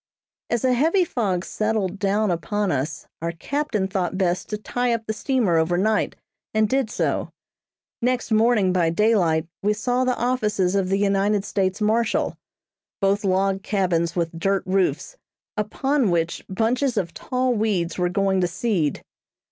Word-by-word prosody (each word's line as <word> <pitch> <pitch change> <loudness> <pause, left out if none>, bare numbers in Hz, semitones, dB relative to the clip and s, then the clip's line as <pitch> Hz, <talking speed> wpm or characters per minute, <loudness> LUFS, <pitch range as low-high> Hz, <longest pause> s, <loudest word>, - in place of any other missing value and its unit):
As 240 +1 0
a 255 - +4
heavy 330 +9 +3
fog 195 - -1
settled 215 -3 -1
down 205 0 +1
upon 200 +4 -1
us, 145 +2 -2 0.2
our 170 0 -1
captain 215 - -2
thought 190 -1 -2
best 180 -2 0
to 210 - -2
tie 245 +3 -1
up 225 -1 -6
the 220 - -2
steamer 220 -7 +1
over 170 +2 +1
night, 215 +3 +1 0.4
and 215 0 +4
did 260 0 0
so. - - -1 0.7
Next 245 0 0
morning 215 -4 +3
by 175 -3 +2
daylight 170 -4 +2 0.2
we 210 +1 +2
saw 245 +4 0
the 255 -1 0
offices 210 -7 0
of 195 -2 +1
the 195 - +2
United 200 0 +1
States 190 +1 -1
marshal; 220 +2 +1 0.6
both 200 +1 +1
log 195 0 +1
cabins 175 -5 0
with 165 -1 -2
dirt 195 +2 +1
roofs, 195 - 0 0.4
upon 260 +4 0
which 170 -1 -1
bunches 235 +5 0
of 170 -4 -1
tall 255 0 -1
weeds 200 -6 -1
were 180 0 +2
going 190 +1 +1
to 180 - +2
seed. 175 - -1
200 Hz, 155 wpm, -23 LUFS, 185-230 Hz, 0.7 s, a